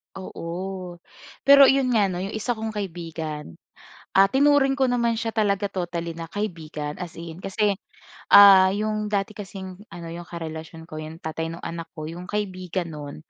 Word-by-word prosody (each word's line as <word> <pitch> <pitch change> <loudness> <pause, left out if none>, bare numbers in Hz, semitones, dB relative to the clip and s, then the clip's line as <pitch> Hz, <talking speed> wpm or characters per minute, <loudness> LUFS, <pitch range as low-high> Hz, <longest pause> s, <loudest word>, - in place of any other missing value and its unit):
Oo. 185 0 -6 0.5
Pero 280 -1 +9
'yon 270 -2 +3
nga 210 -4 +4
'no, 180 -1 -3
'yong 195 - -4
isa 235 +2 -1
kong 220 0 -4
kaibigan, 165 - -6 0.6
ah, 195 0 +8
tinuring 275 0 +4
ko 265 - +4
naman 235 -1 +1
siya 225 0 -1
talaga 205 -2 +1
totally 170 -3 -4
na 165 0 -6
kaibigan, 160 -7 -4
as 170 - -7
in. 165 0 -8
Kasi, 200 +1 +1 0.6
ah 195 -2 +9
'yong 215 0 -1
dati 205 0 -1
kasing 190 -2 -8
ano, 170 -1 -9
‘yong 170 0 -8
karelasyon 160 -1 -7
ko, 155 -1 -7
‘yong 155 +2 -9
tatay 160 +1 -3
nung 165 +1 -8
anak 165 0 -5
ko, 155 - -5
'yong 175 +3 -7
kaibigan 185 -4 -3
no'n, 145 -1 -7
185 Hz, 165 wpm, -24 LUFS, 165-210 Hz, 0.6 s, Pero